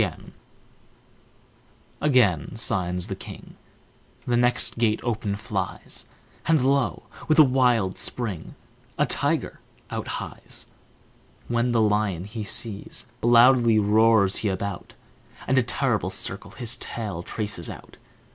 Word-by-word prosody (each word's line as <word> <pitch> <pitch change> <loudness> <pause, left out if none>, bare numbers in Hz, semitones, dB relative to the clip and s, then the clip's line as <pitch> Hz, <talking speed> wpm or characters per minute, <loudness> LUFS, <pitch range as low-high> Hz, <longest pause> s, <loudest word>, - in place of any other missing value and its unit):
Again 120 - +2
signs 90 -5 -1
the - - -5
king, - - -11 0.7
The 120 - +1
next 120 -1 +3
gate 110 -2 +2
open 110 -4 -2
flies, 105 - -4 0.4
And, 155 -5 +3
lo! 140 -1 +1 0.2
with 155 - +3
a 155 - +10
wild 125 -8 +2
spring, 105 -10 -4 0.4
A - - +3
tiger - - -1 0.3
out - - -4
hies. - - -7 0.8
When 120 +1 +1
the 115 -1 +3
lion 105 -4 +1
he 105 +2 -6
sees, 105 0 -5 0.2
loudly 120 -1 +6
roars 105 -1 +4
he 105 - 0
about, 95 0 -5 0.5
And 130 0 +3
a - - +4
terrible 120 -6 0
circle 100 +1 -1
his 115 +2 +1
tail 105 -7 -5
traces 100 -4 -3
out. - - -11
110 Hz, 120 wpm, -25 LUFS, 100-120 Hz, 0.8 s, a